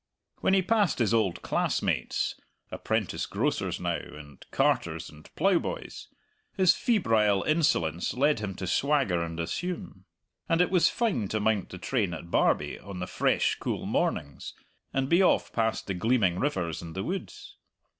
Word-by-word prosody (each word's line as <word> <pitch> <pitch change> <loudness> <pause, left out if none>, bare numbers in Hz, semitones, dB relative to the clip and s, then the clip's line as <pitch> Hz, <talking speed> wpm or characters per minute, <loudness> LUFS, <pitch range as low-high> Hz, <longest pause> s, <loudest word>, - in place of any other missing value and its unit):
When 190 - +3
he 190 - +3
passed 205 -4 +2
his 115 -3 +1
old 105 -6 +1
classmates - - 0 0.4
(apprentice - - -2
grocers - - -1
now, - - -1
and 75 -2 -12
carters 80 -1 0
and 75 0 -16
ploughboys) - - -1 0.5
his 185 -3 +6
febrile 110 - +2
insolence 115 - +1
led 145 0 +2
him 100 -3 -4
to 95 - -5
swagger 135 - +1
and 85 0 -4
assume. 175 - -4 0.4
And 165 - +3
it 180 - +3
was 180 -3 +4
fine 200 - 0
to 110 - -1
mount 105 -2 0
the 90 - -8
train 100 -2 -1
at 85 +1 -10
Barbie - - +1
on 100 -2 -9
the 90 - -3
fresh, - - +1
cool - - -3
mornings, 70 -2 -2 0.4
and 135 0 0
be 170 +6 +4
off 185 - +2
past 115 -1 0
the 100 - -2
gleaming 95 -2 +1
rivers 90 - -1
and 80 -1 -9
the 95 - -2
woods. 190 - -6
110 Hz, 155 wpm, -28 LUFS, -, 0.5 s, his